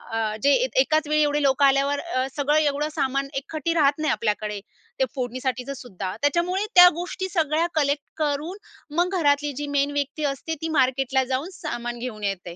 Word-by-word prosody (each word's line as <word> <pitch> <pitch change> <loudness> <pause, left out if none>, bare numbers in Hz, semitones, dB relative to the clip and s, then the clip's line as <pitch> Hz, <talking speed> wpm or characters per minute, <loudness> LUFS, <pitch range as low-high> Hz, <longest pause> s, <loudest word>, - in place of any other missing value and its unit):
अ 220 -1 -1
जे 285 - +5
एक - - -4
एकाच 310 -7 +1
वेळी 305 0 +2
एवढे 295 0 +1
लोकं 275 +1 +4
आल्यावर, 275 +1 +2
अ, 260 -7 -2
सगळं 295 +1 +2
एवढं 295 0 +1
सामान 275 -2 0
एकगठ्ठी 310 +4 -3
राहत 290 -3 +3
नाही 310 -2 +1
आपल्याकडे, 210 -1 -1 0.4
ते 265 - +4
फोडणीसाठीचंसुद्धा. 250 -5 -4
त्याच्यामुळे 345 +7 +1
त्या 360 0 +10
गोष्टी 360 +2 -4
सगळ्या 325 -1 +1
कलेक्ट 285 -1 +1
करून, 305 +4 -2 0.4
मग 360 +3 +1
घरातली 290 -1 +2
जी 290 - -3
मेन 280 +1 +2
व्यक्ती 285 +1 -3
असते, 320 +4 -5
ती 325 - -2
मार्केटला 265 0 +2
जाऊन 275 +7 -2
सामान 240 -6 -4
घेऊन 230 -4 -6
येते. 180 -3 -3
285 Hz, 170 wpm, -24 LUFS, 260-310 Hz, 0.4 s, त्या